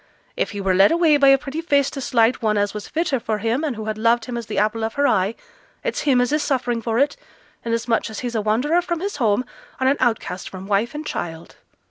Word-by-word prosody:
If - - -1
he 205 - -6
were 190 -1 +1
led 195 +2 +5
away 330 -3 +4
by 280 -1 +4
a 270 0 +7
pretty 275 +4 -5
face 285 -4 +2
to 275 - -6
slight 235 -1 +2
one 215 -2 +1
as 205 0 0
was 210 -1 -6
fitter 315 -5 -1
for 225 -2 -2
him, 230 +7 -1
and 290 -6 -1
who 220 0 -6
had 215 0 -3
loved 230 +1 +2
him 245 - -5
as 235 -2 -5
the - - -4
apple 215 +2 +1
of 220 - -3
her 285 - +2
eye, 195 +4 +1 0.5
it's - - -2
him 255 -2 +4
as 245 +1 +1
is 305 - +2
suffering 245 -5 -1
for 225 0 -1
it, 285 +3 +2 0.5
inasmuch 230 0 0
as 220 - -6
he's 245 -1 -4
a 220 - 0
wanderer 250 +11 +2
from 345 -1 -3
his 395 -2 -4
home, 235 -1 +1 0.3
and 260 - +1
an 275 +2 +3
outcast 225 -7 -1
from 190 0 -9
wife 205 +7 0
and 305 +1 -5
child.' 165 - -6
235 Hz, 250 wpm, -21 LUFS, 215-280 Hz, 0.5 s, a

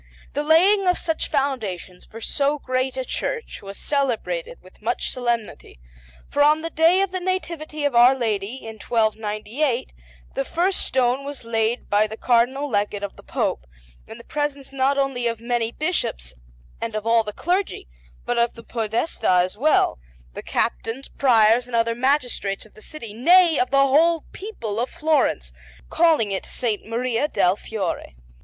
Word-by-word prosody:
The 290 - 0
laying 370 +6 +4
of 360 - +3
such 325 -1 -2
foundations 220 - -2
for 225 - -11
so 285 +5 0
great 255 -1 -2
a 260 - -2
church 465 - -4
was 195 0 -8
celebrated 300 - -1
with - - -19
much - - -1
solemnity, 235 - -3 0.5
for 290 - 0
on 305 +2 +4
the 330 - -4
day 335 +4 +4
of 390 - -3
the 370 - -2
Nativity 335 -5 -3
of 285 - +1
Our 240 +3 +7
Lady, 220 -3 -2
in 220 -1 -8
1298, 220 - -1 0.4
the - - -1
first 365 +3 +1
stone 260 +1 +1
was 285 -2 -7
laid 225 +1 0
by 210 +1 +3
the 220 +1 -8
Cardinal 255 +5 +2
Legate 205 -3 -1
of 200 - -5
the - - -14
Pope, - - -2 0.4
in - - -10
the - - -12
presence 290 -2 -3
not 275 +1 +1
only 270 -3 0
of 230 -1 -2
many 235 -1 -1
Bishops 150 - -2 0.5
and 230 -1 -3
of 215 0 -3
all 230 0 +4
the 210 - -5
clergy, 360 - -2 0.4
but 245 -1 0
of 235 0 +1
the 230 - -11
Podestà 225 - +1
as 185 +2 -4
well, 290 - +2 0.3
the - - -6
Captains, 240 +5 -2
Priors, 235 -2 +4
and 245 - -4
other 230 0 +2
magistrates 245 -6 0
of 215 - -20
the 215 - -16
city, 230 -5 -8
nay, 335 - +5
of 250 - +1
the 275 - +2
whole 300 +4 +4
people 235 - -5
of 245 - -1
Florence, 270 - 0 0.4
calling 315 -11 +3
it 190 - -3
S. - - -5 0.2
Maria 240 +4 -1
del 180 -10 +2
Fiore. 195 - -4
250 Hz, 170 wpm, -23 LUFS, 220-300 Hz, 0.5 s, Our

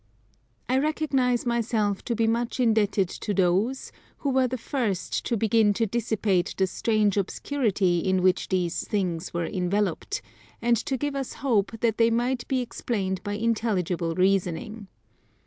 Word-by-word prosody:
I 255 +1 +2
recognize 270 -5 +1
myself 225 -4 0
to 235 - -1
be 225 0 +2
much 235 +3 -1
indebted 215 -5 +2
to 205 +3 -4
those 195 +8 +1 0.3
who 280 - -1
were 260 -1 +3
the 255 +1 -3
first 230 - -2
to 235 - 0
begin 215 -1 +3
to 230 - +1
dissipate 210 -4 0
the 190 - +3
strange 210 +1 +1
obscurity 200 -4 0
in 185 +1 +1
which 185 0 +2
these 180 -2 -1
things 180 -4 -2
were 170 -1 -2
enveloped, 190 - -1 0.4
and 240 0 +3
to 265 - -1
give 290 +1 -2
us 270 -2 -3
hope 225 -3 +1
that 230 -2 +1
they 230 0 +5
might 240 +2 0
be 260 -2 +1
explained 200 -6 -3
by 205 -1 -3
intelligible 205 -7 0
reasoning. 195 +3 0
220 Hz, 150 wpm, -26 LUFS, 190-240 Hz, 0.4 s, they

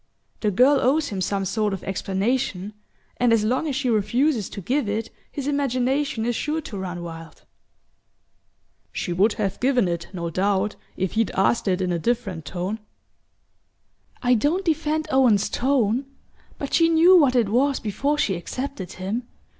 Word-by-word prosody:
The 210 - +1
girl 260 +8 +4
owes 290 +4 +2
him 195 -2 -4
some 195 +1 -1
sort 210 +1 0
of 195 - -5
explanation, 195 +1 -1 0.4
and 245 -1 +3
as 225 -2 +3
long 255 +8 0
as 280 - -2
she 270 -1 -1
refuses 235 +2 +1
to - - -7
give 245 - -1
it 220 +2 -3 0.2
his 280 - -5
imagination 270 -3 0
is 240 0 0
sure 305 +6 -1
to 230 -9 -7
run 180 -2 -5
wild." 165 -1 -9 1.5
"She 175 - -3
would 200 +5 +3
have 195 -3 -2
given 250 -5 +2
it, 170 -1 -3
no 170 -3 -4
doubt, 200 +3 0 0.2
if 190 -1 -1
he'd 225 -4 +1
asked 200 +4 +2
it 185 0 +1
in 180 -1 0
a 170 - 0
different 200 -7 -2
tone." 185 +7 -3 1.4
"I 250 0 +4
don't 305 - +1
defend 315 -1 0
Owen's 245 -7 +4
tone 250 -1 +1 0.5
but 280 - -5
she 330 -1 +5
knew 335 +3 +6
what 280 -7 +5
it 230 -5 +3
was 270 +5 +2
before 275 +8 -1
she 215 -9 +1
accepted 195 +2 -5
him. 210 +7 -4
225 Hz, 165 wpm, -23 LUFS, 195-275 Hz, 1.5 s, knew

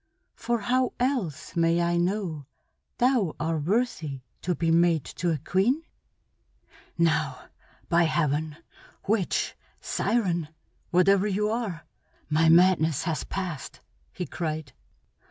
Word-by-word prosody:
For 235 -2 -2
how 255 +4 +1
else 245 - -1
may 165 0 +3
I 170 0 +1
know 175 -5 -1 0.5
thou 240 - +2
are 160 0 -1
worthy 165 - -1 0.2
to 180 -1 -1
be 165 0 +1
mate 165 -3 +3
to 175 - 0
a 160 - +1
queen?" 215 - +1 1.1
"Now, 155 -6 0 0.4
by 170 0 +4
Heaven! 155 -1 0 0.5
Witch, 205 -3 0 0.2
siren, 175 -9 0 0.4
whatever 190 +3 +4
you 210 +1 0
are, 215 -8 -3 0.5
my 160 +1 +4
madness 165 -3 +4
has 165 -2 -2
passed!" 180 -9 -5 0.3
he 180 - -4
cried. 155 -1 -4
170 Hz, 115 wpm, -27 LUFS, 160-200 Hz, 1.1 s, by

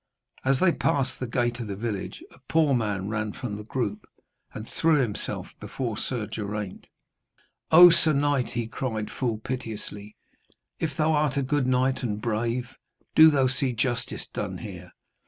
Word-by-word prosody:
As 135 0 +3
they 185 - +5
passed 135 -5 0
the 130 - -3
gate 120 0 0
of 115 - -4
the 100 - -4
village 105 -2 -4
a - - -19
poor 155 -3 +3
man 105 -5 -1
ran 105 -1 -2
from 115 -5 -5
the 105 - -7
group, 105 -2 -3 0.5
and 110 +1 -8
threw 165 -1 +2
himself 115 -6 -3
before 120 -4 -4
Sir 120 0 -3
Geraint. 105 -2 -5 0.8
'O 175 +2 +10
sir 165 -1 +3
knight,' 145 -3 +1
he 120 -1 -1
cried 110 -2 -4
full 120 -5 -1
piteously, 110 -3 -6 0.6
'if 155 -2 -2
thou 155 0 +3
art 150 -2 +1
a 140 - +2
good 135 0 0
knight 130 +1 +2
and 105 -4 -2
a - - -7
brave, 120 +3 -2 0.4
do 160 0 +9
thou 140 -3 +3
see 130 0 0
justice 120 0 -1
done - - -3
here. - - -9
125 Hz, 170 wpm, -26 LUFS, 110-135 Hz, 0.8 s, O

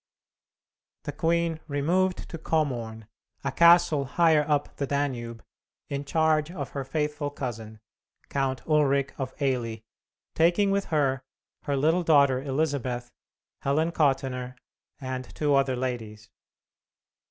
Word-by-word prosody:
The - - -4
queen 165 +2 0
removed 175 +6 0
to 165 - -7
Komorn, 120 -10 -2 0.4
a - - -1
castle 170 -4 +5
higher 160 +2 +3
up 145 -1 0
the 140 - -2
Danube, 125 -5 -2 0.5
in 140 0 -3
charge 160 0 +2
of 160 -6 -6
her 140 - -4
faithful 150 +1 -2
cousin, 115 -6 -6 0.5
Count 135 -2 -2
Ulric 140 -3 +2
of 130 -1 -3
Eily, 120 -5 -1 0.5
taking 175 +5 +3
with 200 0 0
her 140 -5 +1 0.4
her 140 -1 0
little 160 +6 +2
daughter 140 -6 +4
Elizabeth, 135 -4 -2 0.5
Helen 155 +4 +1
Kottenner, 135 -5 0 0.4
and 130 -2 -4
two 150 -2 +1
other 135 -1 +2
ladies. 115 -4 -5
140 Hz, 120 wpm, -27 LUFS, 130-160 Hz, 0.5 s, castle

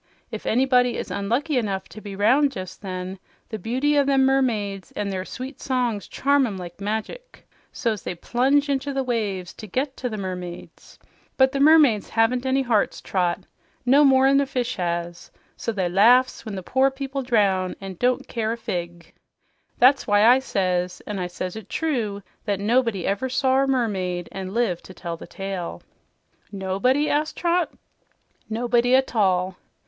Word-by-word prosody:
If - - -6
anybody 250 0 +3
is - - -5
unlucky 255 +9 -1
enough 195 -4 -3
to 205 +6 -11
be 205 -2 -7
'round 270 +8 +3
jes' 185 -1 -6
then, 185 -1 -6 0.3
the 220 - -5
beauty 260 +8 +1
o' - - +4
them 270 -1 +3
mermaids 215 -8 0
an' 205 -1 -3
their 190 -1 -3
sweet 260 +5 -8
songs 245 -6 -1
charm 280 -1 +2
'em 200 -4 -5
like 175 +1 -9
magic; 220 - -5 0.2
so's 230 -7 -2
they 180 - -5
plunge 270 - +1
into 280 0 -1
the 270 0 0
waves 205 -7 -2
to 215 - -10
get 260 +7 -2
to 250 - -3
the 215 - -5
mermaids. 180 -3 -7 0.4
But 265 0 +5
the 275 - -2
mermaids 285 -8 +5
haven't 245 +3 +1
any 265 +1 +2
hearts, 230 -5 +1
Trot, 180 -1 -1 0.4
no 275 +4 +6
more'n 270 0 +5
a 280 - -1
fish 255 -2 -2
has; 170 -1 -3 0.3
so 230 - -3
they 190 -5 -1
laughs 235 +9 +4
when 210 - -4
the 190 - -6
poor 265 +7 +2
people 270 0 -4
drown 200 -7 +1
an' 195 -2 -8
don't 250 0 +1
care 225 -2 -2
a - - -6
fig. 175 -5 -5 0.6
That's 265 +3 +4
why 205 0 +4
I 250 +3 +7
says, 180 -7 -1
an' 205 -2 -4
I 180 - -2
says 180 +1 -5
it 220 -3 -9
true, 230 -11 -2 0.2
that 200 -3 -1
nobody 225 -2 +1
never 200 +8 -1
sawr 265 +1 +2
a - - -4
mermaid 190 -9 -1
an' 190 -1 -6
lived 220 -8 0
to 185 - -12
tell 170 -2 -5
the - - -11
tale." 195 -3 -5 0.7
"Nobody?" 200 +9 +1
asked 305 +1 0
Trot. 345 -2 +1 0.8
"Nobody 240 +2 +2
a 265 - +5
tall." 190 -6 0
225 Hz, 175 wpm, -23 LUFS, 190-265 Hz, 0.8 s, I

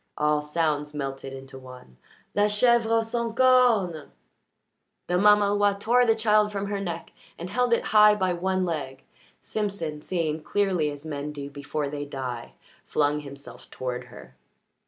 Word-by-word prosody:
All 150 0 +2
sounds 150 -1 -1
melted 135 -1 -5
into 135 0 -10
one. 125 - -14 0.4
"La 205 - +3
chèvre 225 +1 +3
sans 230 0 -3
cornes!" 240 - +3 1.0
The 180 0 0
mamaloi 205 0 +4
tore 245 +4 +3
the 225 - +4
child 215 -1 +3
from 200 -1 -3
her 200 0 -3
neck 170 -4 -5 0.3
and 175 +3 -7
held 250 +2 +1
it 235 - +2
high 210 0 +7
by 185 -3 0
one 185 +1 -1
leg. 140 -6 -4 0.4
Simpson, 195 -8 -4
seeing 160 -3 -2
clearly 185 -5 0
as 145 +1 -9
men 150 -1 -4
do 140 -1 -7
before 145 +1 -4
they 145 0 -5
die, 130 -4 -6 0.3
flung 150 0 0
himself 140 -4 -12
toward 125 -1 -5
her. 65 - -14
170 Hz, 150 wpm, -26 LUFS, 145-210 Hz, 1.0 s, high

